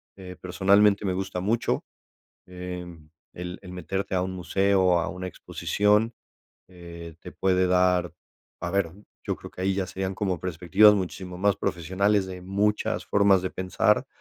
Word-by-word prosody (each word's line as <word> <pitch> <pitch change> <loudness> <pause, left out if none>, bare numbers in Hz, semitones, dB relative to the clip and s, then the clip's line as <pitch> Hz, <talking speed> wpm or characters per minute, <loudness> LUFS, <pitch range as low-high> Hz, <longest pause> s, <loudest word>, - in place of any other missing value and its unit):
eh, 90 -2 -10
personalmente 100 +3 +3
me 95 - 0
gusta 95 -1 -3
mucho. 110 +4 0 0.6
Eh, 90 0 -6 0.5
el 90 +1 -6
el 90 -2 -10
meterte 95 +3 -3
a 90 - +2
un 95 - -3
museo, 95 +1 +2
a - - -2
una 95 -1 -6
exposición, 105 +4 0 0.5
eh, 85 -2 -10
te - - -9
puede 95 -1 +2
dar 90 -1 +2 0.5
a 85 - -3
ver, 95 -3 0 0.3
yo - - 0
creo - - -11
que 90 - -7
ahí 95 0 +1
ya 95 -1 -1
serían 95 +1 -4
como 95 -4 -1
perspectivas 95 +4 +5
muchísimo 90 -1 -4
más 100 0 +2
profesionales 95 +3 0
de 90 -1 -8
muchas 100 +3 0
formas 100 -2 +4
de 95 - -2
pensar, 95 -1 +1
95 Hz, 155 wpm, -26 LUFS, 90-100 Hz, 0.6 s, perspectivas